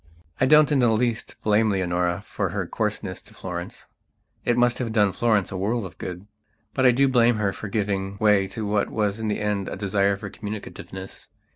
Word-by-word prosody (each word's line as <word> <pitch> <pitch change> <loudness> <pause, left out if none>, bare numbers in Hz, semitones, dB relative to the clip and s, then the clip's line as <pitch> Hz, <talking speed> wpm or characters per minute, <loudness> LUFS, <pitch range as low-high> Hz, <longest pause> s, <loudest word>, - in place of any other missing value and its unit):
I 130 - +3
don't 150 +1 +6
in 145 - +3
the 120 -2 +4
least 115 +1 0
blame 110 +1 +3
Leonora 90 -1 0
for - - -2
her - - -2
coarseness - - -3
to - - -15
Florence; 85 -1 -6 0.6
it 120 - +1
must 120 0 +3
have 120 -3 -2
done 105 -3 +3
Florence 110 -2 +1
a 95 - -4
world 105 +3 -1
of 95 - -11
good. 90 +1 -6 0.5
But 130 -1 +4
I - - +7
do 135 +3 +3
blame 120 -2 +4
her 100 -2 0
for 110 - -7
giving 100 -1 -2
way 105 -2 +3
to 110 +2 -5
what 105 0 0
was 105 -1 -1
in 110 - -2
the 105 - -1
end 105 -2 -1
a - - -4
desire 100 0 +1
for 100 -1 -7
communicativeness. 100 -2 -8
105 Hz, 205 wpm, -24 LUFS, 95-115 Hz, 0.6 s, I